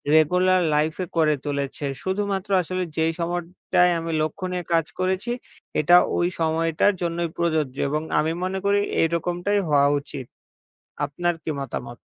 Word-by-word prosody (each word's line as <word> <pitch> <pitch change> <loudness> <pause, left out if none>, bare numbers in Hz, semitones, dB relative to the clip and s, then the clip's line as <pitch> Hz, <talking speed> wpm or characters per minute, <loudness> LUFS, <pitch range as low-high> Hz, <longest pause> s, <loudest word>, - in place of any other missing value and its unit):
Regular 180 +4 +4
লাইফে 155 +4 0
করে 155 -2 +4
তুলেছে। 140 0 -3 0.2
শুধুমাত্র 195 +1 -2
আসলে 185 +2 -2
যেই 160 0 +2
সময়টায় 175 +1 +1
আমি 165 0 -4
লক্ষ্য 155 +5 -2
নিয়ে 180 -1 -2
কাজ 165 -2 +3
করেছি, 190 +5 0 0.5
এটা 165 +4 +6 0.2
ওই 175 - +2
সময়টার 165 +4 +2
জন্যই 170 -1 -1
প্রযোজ্য 155 -6 0
এবং 150 +2 0 0.2
আমি 160 +1 +1
মনে 190 +1 -1
করি 200 0 +3 0.2
এইরকমটাই 175 +4 0
হওয়া 145 -2 +4
উচিত। 140 -2 -8 0.8
আপনার 175 +5 -1
কি - - -4
মতামত? 120 -3 -5
170 Hz, 140 wpm, -24 LUFS, 155-185 Hz, 0.8 s, এটা